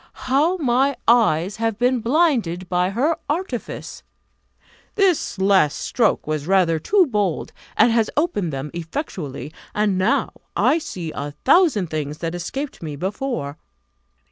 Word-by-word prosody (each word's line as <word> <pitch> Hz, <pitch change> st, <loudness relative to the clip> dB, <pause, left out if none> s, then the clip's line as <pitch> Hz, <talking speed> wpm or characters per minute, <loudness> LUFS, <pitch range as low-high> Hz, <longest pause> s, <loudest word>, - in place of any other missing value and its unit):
How 300 Hz, +8 st, +2 dB
my 270 Hz, -2 st, +2 dB
eyes 200 Hz, -6 st, +3 dB
have 225 Hz, -2 st, -1 dB
been 250 Hz, +1 st, +2 dB
blinded 230 Hz, -, +1 dB
by 180 Hz, 0 st, +1 dB
her 280 Hz, +11 st, +1 dB
artifice! 295 Hz, -6 st, -4 dB, 0.9 s
This 385 Hz, -, +1 dB
last 190 Hz, -6 st, +3 dB
stroke 230 Hz, -4 st, 0 dB
was 155 Hz, -1 st, -3 dB
rather 180 Hz, -4 st, +3 dB
too 380 Hz, -, +3 dB
bold, 205 Hz, -, -1 dB, 0.2 s
and 235 Hz, -, +5 dB
has 225 Hz, -2 st, +2 dB
opened 250 Hz, -, 0 dB
them 135 Hz, +1 st, -5 dB
effectually, 165 Hz, -, -5 dB, 0.2 s
and 210 Hz, -3 st, +1 dB
now 185 Hz, -, +1 dB, 0.2 s
I 330 Hz, -, +3 dB
see 180 Hz, -, -6 dB
a 145 Hz, 0 st, -5 dB
thousand 275 Hz, -, +4 dB
things 150 Hz, -1 st, -3 dB
that 165 Hz, 0 st, -4 dB
escaped 265 Hz, -, -5 dB
me 155 Hz, -3 st, -5 dB
before. 190 Hz, -, -3 dB
205 Hz, 135 wpm, -21 LUFS, 165-270 Hz, 0.9 s, and